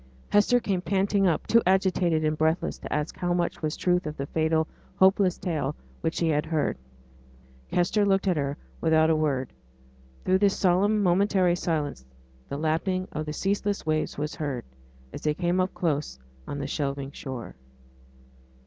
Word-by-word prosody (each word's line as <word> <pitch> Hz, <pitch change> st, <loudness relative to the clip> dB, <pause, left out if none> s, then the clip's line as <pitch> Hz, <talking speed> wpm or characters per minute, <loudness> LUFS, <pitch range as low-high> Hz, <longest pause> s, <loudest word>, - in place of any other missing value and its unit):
Hester 205 Hz, +4 st, +4 dB
came 195 Hz, -6 st, -1 dB
panting 195 Hz, +1 st, +2 dB
up, 165 Hz, -, 0 dB
too 230 Hz, -, +4 dB
agitated 185 Hz, -4 st, +2 dB
and 155 Hz, 0 st, +1 dB
breathless 160 Hz, +2 st, 0 dB
to -, -, -8 dB
ask 150 Hz, +1 st, -1 dB
how 175 Hz, -1 st, -1 dB
much 175 Hz, -1 st, -1 dB
was 155 Hz, -1 st, -2 dB
truth 180 Hz, -2 st, +1 dB
of 150 Hz, -, -5 dB
the 140 Hz, -, -3 dB
fatal, 160 Hz, +1 st, +1 dB, 0.3 s
hopeless 190 Hz, -1 st, +4 dB
tale 150 Hz, -5 st, -2 dB, 0.3 s
which 160 Hz, -, -1 dB
she 165 Hz, -, +1 dB
had 150 Hz, -1 st, +2 dB
heard. 155 Hz, -2 st, 0 dB, 1.0 s
Kester 180 Hz, +4 st, +2 dB
looked 195 Hz, 0 st, +2 dB
at 180 Hz, -, +3 dB
her 140 Hz, -1 st, -2 dB, 0.2 s
without 160 Hz, 0 st, +4 dB
a -, -, +3 dB
word. 140 Hz, -5 st, -1 dB, 0.7 s
Through 185 Hz, +1 st, +3 dB
this 200 Hz, -1 st, +3 dB
solemn 200 Hz, +3 st, +3 dB
momentary 185 Hz, -1 st, +3 dB
silence 150 Hz, -, -2 dB, 0.5 s
the 140 Hz, -, -3 dB
lapping 165 Hz, +5 st, -1 dB
of 155 Hz, 0 st, -4 dB
the 150 Hz, -, -3 dB
ceaseless 200 Hz, +2 st, -1 dB
waves 155 Hz, 0 st, -1 dB
was 150 Hz, 0 st, -3 dB
heard, 140 Hz, -4 st, -4 dB, 0.5 s
as -, -, -7 dB
they 150 Hz, -1 st, 0 dB
came 175 Hz, +2 st, 0 dB
up 185 Hz, 0 st, +1 dB
close 150 Hz, -, -1 dB, 0.3 s
on 145 Hz, -, -4 dB
the 140 Hz, -, -3 dB
shelving 140 Hz, -1 st, -3 dB
shore. 130 Hz, -4 st, -7 dB
165 Hz, 165 wpm, -27 LUFS, 150-190 Hz, 1.0 s, Hester